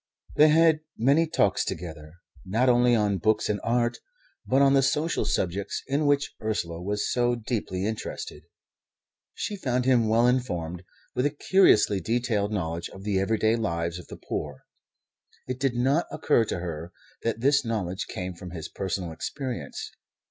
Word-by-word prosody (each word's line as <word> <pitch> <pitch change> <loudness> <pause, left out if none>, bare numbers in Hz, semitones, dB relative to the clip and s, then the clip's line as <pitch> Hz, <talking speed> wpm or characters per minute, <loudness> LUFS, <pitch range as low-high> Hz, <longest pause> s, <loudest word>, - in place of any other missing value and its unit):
They 155 - +7
had 160 0 +5 0.2
many 140 +8 +3
talks 100 - +2
together, 80 -2 -6 0.3
not 115 +7 +1
only 120 0 +4
on 105 -3 +1
books 110 +5 +1
and 105 -1 0
art, 120 0 +1 0.5
but 130 - +3
on 140 0 +5
the 135 - +5
social 150 +5 0
subjects 95 +3 -1
in 145 +2 0
which 145 0 +1
Ursula 85 -6 -2
was 105 +3 -1
so 120 0 +2
deeply 105 -5 -3
interested. 110 0 -5 0.9
She 210 - -3
found 125 -9 -1
him 125 -4 +4
well 115 +2 +4
informed, 90 -10 0 0.3
with 125 +3 +1
a 145 0 -7
curiously 110 - +5
detailed 110 0 0
knowledge 85 -4 -3
of 95 - -11
the 100 -2 0
everyday 110 +3 +2
lives 85 -6 -2
of 90 - -12
the - - -9
poor. - - -5 0.8
It 130 0 -4
did 135 -2 0
not 135 +7 +2
occur 120 -6 +2
to - - -3
her 85 -1 -5 0.3
that 115 -1 -2
this 140 +1 +4
knowledge 100 -6 -3
came 90 0 -5
from 90 +1 -9
his 85 -3 -7
personal 95 -3 -3
experience. 130 - -5
110 Hz, 160 wpm, -26 LUFS, 95-130 Hz, 0.9 s, They